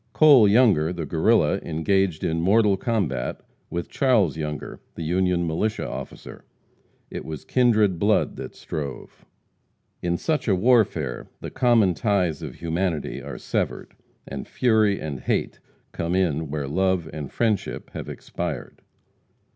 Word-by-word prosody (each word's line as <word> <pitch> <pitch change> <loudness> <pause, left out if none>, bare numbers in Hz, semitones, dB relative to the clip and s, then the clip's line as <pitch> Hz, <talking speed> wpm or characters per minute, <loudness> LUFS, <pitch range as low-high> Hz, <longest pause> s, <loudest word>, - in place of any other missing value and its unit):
Cole 135 -2 +7
Younger, 100 -8 +4
the 85 -3 -4
Guerrilla, - - +2
engaged 85 +1 0
in 80 0 0
mortal 100 +3 +4
combat 95 - -2 0.3
with 85 -1 -4
Charles 110 - +2
Younger, 75 -1 -5 0.2
the 85 - -5
Union 90 +1 +1
militia 95 +7 -1
officer; - - -8 0.7
it - - -5
was 80 -3 -7
kindred 110 -8 +3
blood 105 +3 +2
that - - -7
strove. 70 -3 -7 0.8
In 85 0 0
such 155 - -1
a 100 - +4
warfare 100 - +2
the - - -7
common 115 -7 +3
ties 90 - 0
of - - -7
humanity 85 -1 -2
are - - -7
severed, - - -3 0.3
and 70 0 -6
fury 110 -5 +2
and 75 -4 -5
hate - - -2 0.3
come 85 +1 -2
in 80 -5 0
where 70 -1 -3
love 95 +2 0
and 75 -3 -6
friendship 110 -4 -1
have - - -7
expired. 80 -8 -6
90 Hz, 135 wpm, -24 LUFS, 80-105 Hz, 0.8 s, Cole